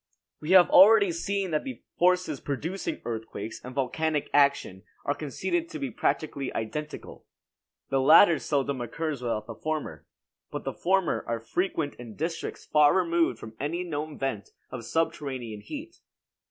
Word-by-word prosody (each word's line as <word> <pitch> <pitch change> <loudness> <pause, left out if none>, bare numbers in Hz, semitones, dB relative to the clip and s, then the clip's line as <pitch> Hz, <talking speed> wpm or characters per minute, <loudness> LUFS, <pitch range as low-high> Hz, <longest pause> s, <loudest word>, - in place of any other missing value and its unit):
We 150 - -7
have 185 -2 +8
already 200 0 +7
seen 195 +2 -2
that 155 - 0
the 265 - -7 0.2
forces 180 -5 +2
producing 180 - -4
earthquakes 110 -1 -5
and 125 0 -9
volcanic 150 +3 -1
action 140 -10 +3 0.2
are 145 - +1
conceded 330 - -2
to - - -6
be 275 -3 -4
practically 140 -4 -1
identical. 150 +7 -6 0.6
The 135 0 +2
latter 160 +4 +7
seldom 140 -3 -1
occurs 145 +4 -3
without 115 -3 -2
the 115 - -7
former; 150 - -4 0.4
but - - -5
the - - -3
former 190 -1 +1
are 115 0 -1
frequent 155 +4 -2
in 115 -3 -9
districts 165 +2 -4
far 150 -1 +5
removed 170 -8 +2
from 110 0 -10
any 165 +6 -2
known 155 -3 -4
vent 135 -7 -3 0.2
of 120 -3 -6
subterranean 130 -8 -2
heat. 310 - -8
150 Hz, 150 wpm, -27 LUFS, 125-175 Hz, 0.6 s, have